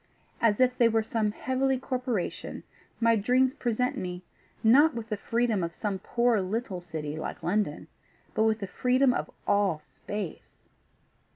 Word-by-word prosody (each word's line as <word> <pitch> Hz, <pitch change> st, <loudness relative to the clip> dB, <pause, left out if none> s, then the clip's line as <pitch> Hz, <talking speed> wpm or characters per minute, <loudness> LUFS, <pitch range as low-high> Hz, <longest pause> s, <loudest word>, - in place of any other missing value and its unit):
As 220 Hz, -1 st, +3 dB
if 255 Hz, -1 st, +4 dB
they 235 Hz, -2 st, +4 dB
were 225 Hz, 0 st, +2 dB
some 220 Hz, -1 st, 0 dB
heavenly 260 Hz, +3 st, 0 dB
corporation, 250 Hz, -6 st, -3 dB, 0.4 s
my 230 Hz, 0 st, +4 dB
dreams 250 Hz, +5 st, +3 dB
present 250 Hz, -2 st, -1 dB
me, 180 Hz, 0 st, -5 dB, 0.4 s
not 285 Hz, +7 st, +6 dB
with 230 Hz, -1 st, -5 dB
the 215 Hz, -, 0 dB
freedom 225 Hz, -1 st, 0 dB
of 170 Hz, 0 st, -4 dB
some 200 Hz, -3 st, -2 dB
poor 235 Hz, +1 st, +2 dB
little 190 Hz, -1 st, -3 dB
city 155 Hz, -3 st, -5 dB
like 155 Hz, -, -5 dB
London, 180 Hz, -5 st, -1 dB, 0.5 s
but 220 Hz, -, +2 dB
with 220 Hz, 0 st, +1 dB
the -, -, -1 dB
freedom 250 Hz, +5 st, +2 dB
of -, -, -2 dB, 0.2 s
all 200 Hz, -5 st, +2 dB
space." 180 Hz, +4 st, -8 dB
220 Hz, 155 wpm, -28 LUFS, 195-250 Hz, 0.5 s, not